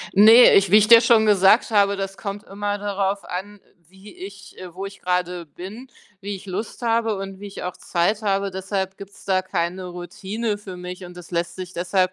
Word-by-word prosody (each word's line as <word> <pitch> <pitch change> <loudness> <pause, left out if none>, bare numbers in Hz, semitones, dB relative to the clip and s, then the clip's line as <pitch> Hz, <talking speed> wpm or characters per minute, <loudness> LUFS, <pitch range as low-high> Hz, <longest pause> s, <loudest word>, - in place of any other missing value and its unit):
Ne, 225 +5 +8
ich 195 -2 +4
wie 210 - +8
ich 215 0 +2
dir 230 -1 +9
schon 225 -2 +4
gesagt 205 +4 +4
habe, 200 -1 +3
das 195 0 -5
kommt 205 0 -6
immer 205 +1 -4
darauf 200 -1 -2
an, 200 +3 -6 0.3
wie 190 +2 -15
ich 195 +1 -11
äh, 180 -2 -10
wo 195 +2 -5
ich 195 - -11
gerade 180 -1 -2
bin, 200 - -10 0.3
wie 200 +1 -5
ich 195 - -14
Lust 205 +6 -6
habe 225 -2 +1
und 195 0 -7
wie 205 - -8
ich 200 - -9
auch 180 - -5
Zeit 195 +5 -1
habe. 200 -1 0
Deshalb 190 0 -4
gibt's 200 0 -13
da 185 -1 +1
keine 180 0 -3
Routine 200 +5 -4
für 190 -3 -9
mich 180 +1 -8
und 175 0 -11
das 175 -1 -12
lässt 170 -1 -2
sich 185 -1 -7
deshalb 185 +1 0
195 Hz, 210 wpm, -22 LUFS, 185-205 Hz, 0.3 s, dir